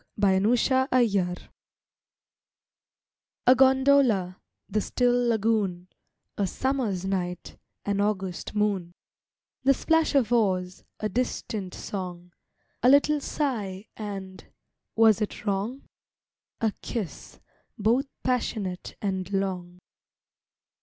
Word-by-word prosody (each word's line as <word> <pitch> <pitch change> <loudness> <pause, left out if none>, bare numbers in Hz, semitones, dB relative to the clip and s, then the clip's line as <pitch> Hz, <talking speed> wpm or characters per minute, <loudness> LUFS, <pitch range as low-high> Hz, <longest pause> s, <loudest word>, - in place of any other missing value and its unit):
ON 190 -1 +4
THE 260 +4 +3
LAGOON 200 -8 +2 2.1
A 255 - +8
gondola, 260 -8 +4 0.3
the 215 +2 0
still 245 +2 +1
lagoon; 205 -5 0 0.5
A 200 - +2
Summer's 235 -7 -1
night, 180 -2 -3 0.3
an 200 0 0
August 195 -2 -2
moon; 200 -5 0 0.7
The 275 +1 +5
splash 320 0 +2
of 245 -4 +3
oars, 185 -5 +1 0.2
a 215 - -1
distant 215 -5 -3
song, 180 -3 -6 0.5
A 245 - +5
little 285 +2 +5
sigh, 215 -11 -2
and—was 205 +2 -1
it 210 - -4
wrong? 205 +7 -2 0.8
A 220 -2 +1
kiss, 215 -8 -6 0.4
both 235 +6 +2 0.2
passionate 215 -7 -2
and 190 -2 -2
long. 185 -3 -2
210 Hz, 95 wpm, -26 LUFS, 190-245 Hz, 2.1 s, A